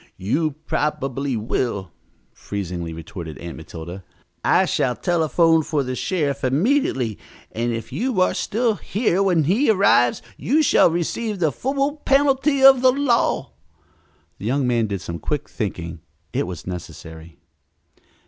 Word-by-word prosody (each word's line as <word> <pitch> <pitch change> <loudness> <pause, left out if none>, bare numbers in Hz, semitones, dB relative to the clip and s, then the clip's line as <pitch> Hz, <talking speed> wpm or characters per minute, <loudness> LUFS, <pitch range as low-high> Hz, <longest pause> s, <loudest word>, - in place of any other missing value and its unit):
"You 145 - -1
probably 135 -3 -1
will," 105 -4 -2 0.4
freezingly 90 -4 -5
retorted 80 -2 -8
Aunt 85 -1 -7
Matilda. 85 +3 -9 0.4
"I - - +4
shall 125 - 0
telephone 165 -1 +2
for 150 -2 -1
the 130 0 -4
sheriff 145 -4 -1
immediately, 135 - +1 0.3
and 120 +2 -1
if 115 -1 -5
you 245 -4 -1
are 185 - +3
still 225 -1 0
here 200 -3 0
when 180 -5 +3
he 205 - +2
arrives 185 - +3
you 305 +5 +2
shall 270 - +5
receive 200 +6 -2
the 160 -5 +1
full 275 - -1
penalty 275 0 +2
of 270 -2 +8
the 255 0 +6
law." 260 -3 +1 0.9
The - - -7
young 135 +2 +1
man 120 -3 +1
did 100 -3 -4
some 85 0 -6
quick 150 - -3
thinking. 85 -7 -5 0.3
It - - -1
was 90 -3 -7
necessary. 85 -2 -9
140 Hz, 140 wpm, -22 LUFS, -, 0.9 s, of